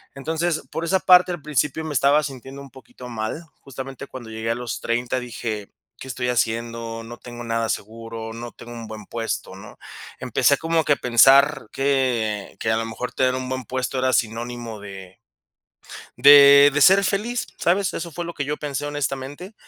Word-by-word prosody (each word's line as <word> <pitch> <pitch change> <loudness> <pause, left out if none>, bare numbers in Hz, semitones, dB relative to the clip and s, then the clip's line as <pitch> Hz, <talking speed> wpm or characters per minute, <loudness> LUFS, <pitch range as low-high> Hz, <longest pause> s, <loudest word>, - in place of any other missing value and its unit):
Entonces, 160 +4 -2
por 165 - -4
esa 190 +2 +2
parte, 180 0 +6
al 175 - -7
principio 150 +1 -1
me 155 - -4
estaba 145 +2 +3
sintiendo 135 -1 -8
un 140 -1 -12
poquito 130 -1 -13
mal. 115 +8 -4 0.2
Justamente 135 +1 -8
cuando 120 -4 -10
llegué 110 +1 -4
a - - 0
los 120 -2 -5
30 120 +2 -1
dije: 115 -4 -5 0.3
"¿Qué - - -9
estoy 125 -1 -3
haciendo? 115 -1 -2
No 120 +1 -10
tengo 120 -1 -10
nada 115 -1 -1
seguro, 115 +1 -5
no 120 +1 -7
tengo 120 - -12
un 115 -1 -8
buen 110 -1 -9
puesto", 115 -3 -4
¿no? 95 - -13 0.4
Empecé - - +2
como 165 0 0
que 150 - +3
a - - +1
pensar 135 +2 +5
que 125 -7 -1
que 110 - 0
a 110 - +2
lo 115 - -2
mejor 115 +2 -5
tener 130 -1 +1
un 130 0 -4
buen 130 -1 -4
puesto 130 +1 -3
era 130 0 +1
sinónimo 115 0 -2
de 95 -2 -11 1.0
de 140 0 +9
de 150 - +1
ser 195 +6 +7
feliz. 215 +5 -1
¿Sabes? 185 +2 +1
Eso 170 0 -5
fue 175 +2 -5
lo 170 - -6
que 145 - -3
yo 150 +2 -3
pensé 145 -1 -4
honestamente. 145 - -4
130 Hz, 185 wpm, -22 LUFS, 115-145 Hz, 1.0 s, de